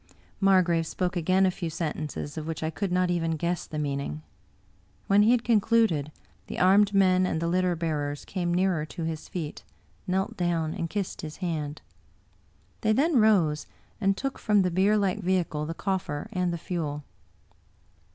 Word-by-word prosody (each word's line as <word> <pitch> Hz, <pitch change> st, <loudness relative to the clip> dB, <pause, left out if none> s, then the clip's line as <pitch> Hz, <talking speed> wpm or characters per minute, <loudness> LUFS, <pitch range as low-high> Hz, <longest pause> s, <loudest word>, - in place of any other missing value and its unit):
Mar 195 Hz, -2 st, +5 dB
grave 165 Hz, -2 st, 0 dB
spoke 180 Hz, +2 st, -2 dB
again 185 Hz, +3 st, +3 dB
a 185 Hz, -, +3 dB
few 175 Hz, -2 st, -4 dB
sentences, 155 Hz, -2 st, -4 dB
of 155 Hz, -1 st, -5 dB
which 160 Hz, -1 st, -4 dB
I 160 Hz, -, -1 dB
could 195 Hz, +2 st, -3 dB
not 180 Hz, 0 st, +2 dB
even 165 Hz, -2 st, 0 dB
guess 170 Hz, +2 st, -2 dB
the 155 Hz, -, -6 dB
meaning. 140 Hz, -, -3 dB, 0.8 s
When 200 Hz, +1 st, +4 dB
he 210 Hz, -, +5 dB
had 240 Hz, -1 st, +3 dB
concluded, 220 Hz, -, +2 dB, 0.4 s
the -, -, -6 dB
armed 195 Hz, +3 st, +5 dB
men 185 Hz, -1 st, +4 dB
and 160 Hz, -, -1 dB
the 165 Hz, -, -2 dB
litter 180 Hz, 0 st, +1 dB
bearers 150 Hz, -3 st, -3 dB
came 175 Hz, -3 st, -2 dB
nearer 180 Hz, -3 st, +1 dB
to 165 Hz, +2 st, -6 dB
his 160 Hz, -1 st, -4 dB
feet, 160 Hz, -5 st, -5 dB, 0.4 s
knelt 190 Hz, +1 st, -1 dB
down, 165 Hz, -3 st, 0 dB
and 165 Hz, -, -3 dB
kissed 200 Hz, -1 st, -3 dB
his 155 Hz, -1 st, -7 dB
hand. 155 Hz, -5 st, -4 dB, 1.0 s
They 215 Hz, 0 st, +3 dB
then 290 Hz, +5 st, +3 dB
rose, 175 Hz, -9 st, +3 dB, 0.3 s
and 195 Hz, -1 st, +2 dB
took 270 Hz, 0 st, -3 dB
from 210 Hz, -3 st, +3 dB
the 180 Hz, -, 0 dB
bierlike 200 Hz, +2 st, +2 dB
vehicle 175 Hz, -5 st, 0 dB
the 165 Hz, -, -4 dB
coffer 185 Hz, -7 st, -2 dB
and 180 Hz, -1 st, 0 dB
the 170 Hz, -, -2 dB
fuel. 155 Hz, -4 st, -4 dB
175 Hz, 170 wpm, -27 LUFS, 160-195 Hz, 1.0 s, Mar